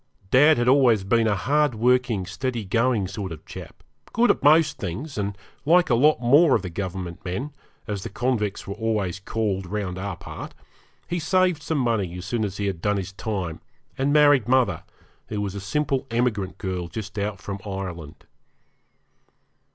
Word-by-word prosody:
Dad 150 +4 +6
had 120 0 +1
always 125 -6 +5
been 115 +3 +2
a 105 - +2
hard 145 +4 +1
working, 120 -3 +2
steady 115 +4 -3
going 115 0 +1
sort 95 -1 -5
of 80 -2 -9
chap, - - -10 0.3
good 240 +2 +4
at - - -2
most 155 0 +4
things, 120 - -5
and 100 -1 -3 0.3
like 175 +1 +4
a - - +5
lot 145 +3 +4
more 140 +5 +5
of - - -1
the 90 - -5
Government 90 -1 -5
men, 125 +12 -4 0.3
as 105 -3 -4
the - - -6
convicts 110 -2 -1
were 100 - -4
always 105 -4 -1
called 100 -2 -2
round 95 -2 -3
our 95 -1 -4
part, - - -9 0.5
he 175 - -2
saved 180 0 +2
some 160 0 -2
money 110 -9 0
as 90 - -7
soon 110 +3 -1
as 100 -1 -3
he 100 - -2
had 95 -4 -3
done 105 +1 +1
his 95 0 -5
time, 95 -6 -4 0.3
and 135 +2 0
married 145 -6 +5
mother, 125 -4 +2 0.5
who 105 - -4
was 100 -2 -2
a 100 - -6
simple 135 +5 -1
emigrant 115 -5 -1
girl 90 -3 -3
just 105 +2 -6
out 100 -1 -2
from 100 -1 -6
Ireland. 90 -6 -6
110 Hz, 180 wpm, -24 LUFS, 95-130 Hz, 0.5 s, Dad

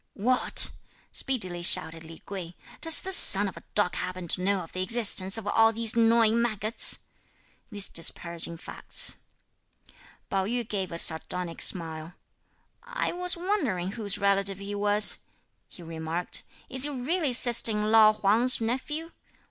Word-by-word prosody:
"What!" 250 +5 +1 0.4
speedily 185 -10 -2
shouted 165 -1 +4
Li 160 0 -15
Kuei, 180 -3 -9 0.3
"does 325 -1 +5
this 380 0 +2
son 200 - +7
of 190 - -9
a - - -13
dog 205 -4 -1
happen 185 -1 -7
to 180 - -1
know 195 0 -1
of 165 - -13
the 185 - -5
existence 200 -2 +3
of 225 - -8
all 225 +2 +2
these 225 +1 +1
gnawing 230 0 +2
maggots?" 215 -1 -3 0.7
(these 205 -2 +1
disparaging 170 0 -4
facts). - - +1 1.1
Pao 195 -1 -3
yü 240 +2 -4
gave 195 -5 -5
a 170 - -7
sardonic 170 +1 +1
smile. 165 -1 0 0.7
"I - - -5
was 360 0 +1
wondering 340 - -3
whose 205 -3 -4
relative 200 -1 0
he 200 +1 -8
was," 205 +1 +2 0.5
he 175 - -15
remarked; 165 +1 -5 0.3
"is 260 -1 -3
he 290 - +5
really 290 +3 -3
sister 240 -1 +4
in 210 0 -3
law 215 -1 +5
Huang's 215 +4 0
nephew? 280 +8 -5
205 Hz, 150 wpm, -25 LUFS, 180-235 Hz, 1.1 s, son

